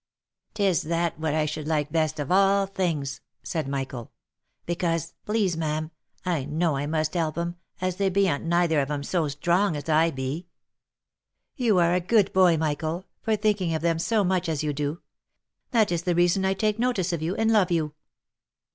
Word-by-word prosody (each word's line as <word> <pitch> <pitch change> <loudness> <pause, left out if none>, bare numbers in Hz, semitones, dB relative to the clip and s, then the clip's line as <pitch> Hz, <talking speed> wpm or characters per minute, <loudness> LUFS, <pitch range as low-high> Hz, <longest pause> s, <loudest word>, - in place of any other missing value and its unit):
" - - -54
Tis 195 -5 +2
that 170 0 -1
what 155 -1 -1
I 155 -1 +2
should 150 0 -4
like 150 -2 0
best 155 -2 0
of 145 +1 -3
all 195 +1 +4
things," 160 -8 -2 0.2
said 160 -5 -3
Michael. 135 -4 -4 0.3
" - - -51
Because, 165 -1 -1
please 210 -5 +1
ma'am, 155 0 -2 0.3
I 170 -6 0
know 155 +1 0
I 140 +1 -2
must 155 0 -1
help 165 -3 -1
'em, 170 +1 -3 0.2
as 185 -1 -2
they 200 -1 +2
beant 190 -6 +1
neither 170 -2 +2
of 135 0 -1
'em 145 -1 -2
so 165 +1 0
strong 170 +6 +1
as 145 +2 -6
I 160 +2 +4
be." 135 +5 -4 0.5
" - - -59
You 215 -5 +4
are 170 -1 +4
a 180 - +3
good 200 +3 +2
boy, 180 -3 +5
Michael, 160 +3 -2 0.2
for 220 -1 +1
thinking 205 -6 0
of 160 - -3
them 165 -1 +1
so 215 +4 +1
much 185 -2 0
as 155 -2 -1
you 150 -1 -1
do. 145 +3 -3 0.7
That 220 -5 +3
is 170 -1 0
the 175 0 0
reason 175 +2 +3
I 190 0 +1
take 215 +1 0
notice 205 -8 0
of 165 - -2
you, 170 +4 -1
and 225 0 +2
love 200 -4 +4
you." 160 -4 0
170 Hz, 200 wpm, -26 LUFS, 155-185 Hz, 0.7 s, boy